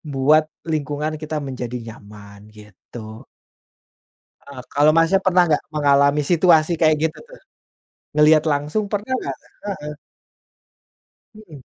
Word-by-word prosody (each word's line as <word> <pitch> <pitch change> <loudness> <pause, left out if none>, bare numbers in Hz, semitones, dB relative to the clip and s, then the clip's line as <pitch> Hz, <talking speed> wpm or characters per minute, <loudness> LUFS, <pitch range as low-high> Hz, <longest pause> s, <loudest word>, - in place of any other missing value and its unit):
buat 150 +1 +2 0.2
lingkungan 155 0 -3
kita 155 0 -5
menjadi 125 -2 -5
nyaman 105 -2 -13
gitu. 110 +1 -13 1.2
Ah, 140 -2 -11
kalau, 145 +2 +4
Mas-nya 165 +4 +3
pernah 180 -1 +4
nggak 150 - +1
mengalami 140 0 +3
situasi 170 -2 +4
kayak 155 -1 +4
gitu 160 0 -1
tuh? - - -15 0.8
Ngelihat 155 0 +5
langsung 150 +9 -1
pernah 205 +4 -4
nggak? 135 -1 -5 0.3
Heeh. 150 -7 -6 1.4
Mhm. 165 -11 -14
150 Hz, 110 wpm, -20 LUFS, 130-160 Hz, 1.4 s, Ngelihat